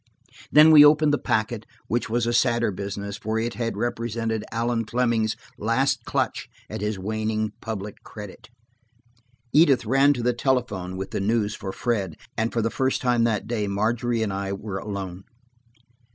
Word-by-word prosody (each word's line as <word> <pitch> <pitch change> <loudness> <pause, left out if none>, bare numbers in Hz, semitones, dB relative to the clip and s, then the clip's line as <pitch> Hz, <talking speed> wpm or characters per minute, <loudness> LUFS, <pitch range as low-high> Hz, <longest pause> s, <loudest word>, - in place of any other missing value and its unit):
Then 155 +1 +8
we 150 -2 +10
opened 150 0 +5
the 145 - +2
packet, 110 0 -1 0.2
which 120 0 -1
was 120 +1 +1
a 120 - 0
sadder 120 -2 +2
business, 100 +1 -5
for 110 +1 -2
it 115 +1 -1
had 115 +2 -3
represented 115 -2 -2
Allan 115 0 0
Fleming's 115 -1 0 0.2
last 115 +6 +1
clutch - - -1 0.2
at - - -5
his 105 -1 -1
waning 110 +2 -2
public 105 -2 -6
credit. 105 -1 -10 1.0
Edith 145 -6 +5
ran 135 +5 +4
to 120 -4 -4
the 125 +1 +2
telephone 115 -8 -1
with 95 0 -5
the - - -2
news 105 0 +1
for 95 -3 -5
Fred, 100 -6 -2 0.2
and 110 +1 0
for 115 - 0
the 115 - 0
first 130 0 0
time 120 -2 +2
that 110 -3 0
day 110 -3 -2
Margery 115 +3 0
and 100 -3 -2
I 100 0 -3
were 100 -1 -5
alone. 95 -2 -6
110 Hz, 165 wpm, -24 LUFS, 105-120 Hz, 1.0 s, we